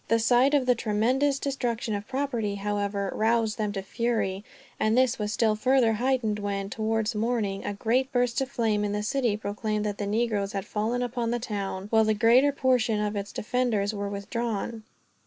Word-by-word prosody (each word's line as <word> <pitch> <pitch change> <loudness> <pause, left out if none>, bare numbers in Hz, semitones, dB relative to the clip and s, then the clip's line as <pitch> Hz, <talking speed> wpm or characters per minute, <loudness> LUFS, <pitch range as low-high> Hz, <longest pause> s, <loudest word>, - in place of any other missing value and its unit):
The 230 - +3
sight 245 +5 +4
of 275 -3 +2
the 250 - +5
tremendous 245 +6 +1
destruction 245 -5 -2
of 205 0 -4
property, 255 -6 -2
however, 200 -1 -2
roused 225 0 +1
them 210 -1 0
to 195 -2 -4
fury; 205 -2 -1 0.4
and 215 +2 +2
this 255 -1 +3
was 210 0 -2
still 215 -1 +2
further 250 0 +3
heightened 235 -2 0
when, 200 -1 -3
towards 220 0 -1
morning, 215 -3 -1
a 205 - -3
great 250 +6 0
burst 245 0 +1
of 265 - -2
flame 220 -6 0
in 205 0 -1
the 210 0 -2
city 235 -2 0
proclaimed 210 0 -2
that 205 -1 -3
the 205 - -2
negroes 210 -2 0
had 195 -2 -3
fallen 230 +4 -1
upon 240 -1 -2
the 240 - 0
town, 200 -5 -4
while 220 -1 +5
the 215 0 +2
greater 240 +6 +5
portion 250 -5 +1
of 210 0 -1
its 200 0 -4
defenders 220 -3 0
were 200 -1 -3
withdrawn. 220 +2 -3
220 Hz, 190 wpm, -27 LUFS, 205-245 Hz, 0.4 s, the